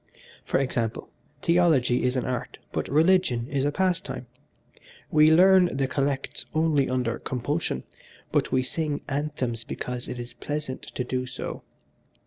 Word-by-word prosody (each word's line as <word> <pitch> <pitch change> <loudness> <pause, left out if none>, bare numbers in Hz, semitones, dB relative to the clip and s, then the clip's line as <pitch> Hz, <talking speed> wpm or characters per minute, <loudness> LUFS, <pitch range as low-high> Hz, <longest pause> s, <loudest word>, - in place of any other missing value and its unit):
For - - +1
example, 120 -4 -2 0.3
theology 160 -9 +3
is 125 +1 +1
an 130 - 0
art 125 -2 -3
but - - -2
religion 155 -6 +3
is 140 -1 +1
a 145 - +2
pastime: 180 -6 -1 0.9
we 155 0 +6
learn 180 -1 +6
the 135 - +2
collects 140 0 -2
only 155 -4 +2
under 125 -2 -1
compulsion, 130 - -2 0.5
but - - +1
we 130 0 +2
sing 150 +2 -2
anthems 135 -5 -2
because 125 +1 -4
it 125 - -5
is 120 0 -7
pleasant 145 -3 -4
to 125 - -1
do 125 0 -2
so. 130 - -6
135 Hz, 140 wpm, -26 LUFS, 125-155 Hz, 0.9 s, we